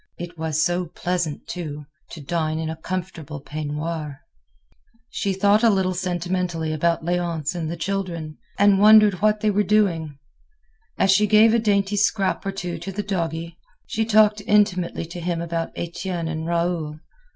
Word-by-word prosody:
It 175 0 -7
was 160 -2 0
so 175 0 -1
pleasant, 170 -2 -3
too, 150 -4 -6 0.2
to 160 - -9
dine 155 +1 -1
in 160 0 -2
a - - -5
comfortable 165 -4 -5
peignoir. 150 0 -5 0.9
She 200 - -1
thought 200 +3 +3
a 235 - +5
little 190 -3 +1
sentimentally 175 -2 -2
about 165 +2 0
Léonce 170 -3 -1
and 165 -3 -3
the 170 - -4
children, 170 -4 -4 0.2
and 200 -1 +5
wondered 210 -2 +6
what 210 0 +2
they 215 - +2
were 205 +1 +2
doing. 180 -8 +1 0.8
As 195 - +3
she 210 +2 +4
gave 220 +2 +6
a 235 - +4
dainty 205 -2 +1
scrap 200 -1 +1
or - - 0
two 180 -3 -5
to 195 +4 -6
the 205 +2 -4
doggie, 170 -3 -3 0.3
she 220 - -1
talked 215 -1 +4
intimately 200 -6 +2
to 170 +2 -8
him 170 0 -2
about 165 0 -3
Etienne 170 0 -4
and 160 0 -4
Raoul. 170 -3 -1
175 Hz, 160 wpm, -23 LUFS, 160-195 Hz, 0.9 s, wondered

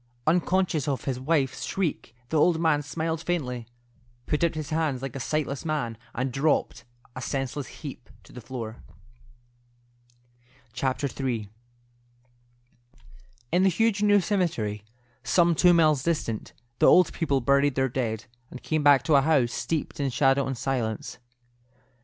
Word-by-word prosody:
Unconscious 175 -2 +1
of 140 -3 -1
his 130 -2 -2
wife's 135 -1 0
shriek, 165 -10 -3
the 160 - 0
old 165 +1 +3
man 160 -3 +2
smiled 160 +3 -3
faintly, 125 -9 -3 0.6
put 150 +2 -1
out 170 -1 +1
his 155 -1 -5
hands 155 -5 -1
like 135 -1 -5
a - - -4
sightless 140 0 -2
man, 150 -8 -2 0.2
and 130 +2 -1
dropped, 135 -3 0 0.3
a 130 - -6
senseless 135 +1 -3
heap, 140 -5 -10
to - - -17
the 125 - -9
floor. 115 -2 -6 2.0
III. 130 -4 -2 2.0
In 175 +2 +3
the 190 - +5
huge 210 +3 +1
new 205 -1 +5
cemetery, 160 - -1 0.4
some 170 -1 +3
two 180 +2 +5
miles 155 -5 +4
distant, 140 -8 -2 0.3
the - - +5
old 180 - +6
people 145 -5 0
buried 140 +2 +2
their 130 0 +2
dead, 115 -4 -3 0.2
and 130 - -10
came 155 -1 0
back 145 -3 +5
to 160 - +1
a 140 - +6
house 135 -5 +2
steeped 160 -2 -3
in 140 -1 0
shadow 135 +1 +2
and 135 -1 -3
silence. 120 -5 -3
140 Hz, 145 wpm, -26 LUFS, 130-160 Hz, 2.0 s, old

